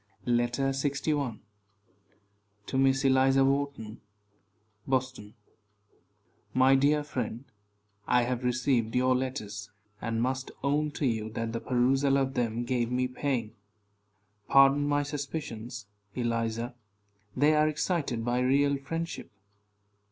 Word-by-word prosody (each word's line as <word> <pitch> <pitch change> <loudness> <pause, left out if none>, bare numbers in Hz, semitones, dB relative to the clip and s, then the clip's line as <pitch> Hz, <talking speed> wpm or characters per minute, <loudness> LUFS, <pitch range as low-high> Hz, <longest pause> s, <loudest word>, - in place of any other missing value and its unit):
LETTER 120 +3 +1
LXI. 140 -2 -1 1.3
TO 130 - -3
MISS 135 0 +3
ELIZA 135 0 +4
WHARTON. 135 -5 -2 0.9
BOSTON. 130 -5 -2 1.2
My 130 +1 +5
dear 145 +2 +3
friend: 125 -3 -4 0.6
I 125 0 +4
have 125 0 -2
received 125 -2 0
your 130 0 +3
letters, 110 -6 -4 0.3
and 115 -1 -2
must 130 +2 -1
own 150 +2 +1
to 145 - -2
you 110 -3 -1
that 115 0 -3
the 115 - -2
perusal 135 +2 +2
of 135 -1 0
them 120 -2 -1
gave 120 -1 -1
me 125 0 +1
pain. 125 -4 -2 0.9
Pardon 135 +1 +5
my 145 0 +2
suspicions, 140 -5 -5 0.3
Eliza; 115 -1 -2 0.6
they 145 +4 +4
are 155 0 +4
excited 150 -7 -1
by 120 +1 +1
real 140 +2 +2
friendship. 165 +5 -5
130 Hz, 115 wpm, -29 LUFS, 120-140 Hz, 1.3 s, My